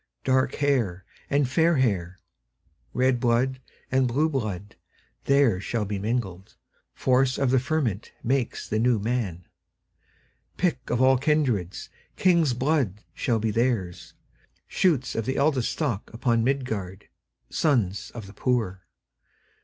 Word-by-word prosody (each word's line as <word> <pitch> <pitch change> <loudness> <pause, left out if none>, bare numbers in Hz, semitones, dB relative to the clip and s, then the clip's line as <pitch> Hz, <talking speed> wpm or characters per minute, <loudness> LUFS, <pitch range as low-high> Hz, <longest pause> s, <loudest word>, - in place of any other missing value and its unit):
Dark 130 0 +2
hair 120 -11 0 0.2
and 140 -1 +2
fair 165 +4 +3
hair, 95 -8 0 0.7
Red 130 -1 +2
blood 125 +2 +1 0.3
and 130 0 +3
blue 145 +7 +1
blood, 105 - -4 0.5
There 140 -9 +3
shall 110 +1 -2
be 100 0 -3
mingled; 100 -4 -3 0.4
Force 130 0 +2
of 135 -3 +1
the 130 - +4
fermentMakes 125 -2 -2
the 110 - -1
New 120 0 +3
Man.Pick 115 - -5
of 120 +1 +2
all 130 -1 +5
kindreds, 130 - 0 0.3
King's 170 -8 +3
blood 130 - 0
shall 120 -3 0
theirs 110 -4 -1 0.4
be, - - -38
Shoots 145 -9 +1
of 115 0 -3
the 130 - 0
eldestStock 140 -4 0
upon 115 0 +1
Midgard, 110 -8 -2 0.4
Sons 110 - +1
of 115 -4 -6
the 100 - -12
poor. 100 -7 -1
125 Hz, 120 wpm, -25 LUFS, 105-135 Hz, 0.7 s, all